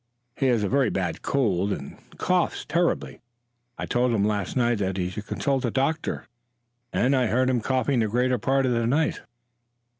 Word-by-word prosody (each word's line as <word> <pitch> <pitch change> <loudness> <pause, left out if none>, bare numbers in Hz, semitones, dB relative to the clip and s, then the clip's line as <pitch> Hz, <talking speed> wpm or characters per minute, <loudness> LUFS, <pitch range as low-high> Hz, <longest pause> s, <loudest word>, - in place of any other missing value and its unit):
"He 135 - +1
has 120 -4 +2
a - - +1
very 135 0 +2
bad 90 -4 -2
cold 100 -8 +1
and 70 -7 -5 0.2
coughs 180 -2 0
terribly. 175 +1 -1 0.6
I - - -3
told 125 0 +1
him 105 -3 +2
last 105 +1 -1
night 120 -3 +2
that 95 -1 -1
he 90 -1 -1
should 105 +3 -7
consult 135 -2 -1
a 120 - +1
doctor, 140 +6 -1 0.7
and 135 +3 +2
I 130 -2 +2
heard 130 +3 +2
him 125 -2 +1
coughing 130 +1 +1
the 110 - +2
greater 125 +3 +1
part 135 0 +1
of 130 - +1
the 115 -1 +1
night." 150 +6 +1
125 Hz, 185 wpm, -25 LUFS, 105-135 Hz, 0.7 s, has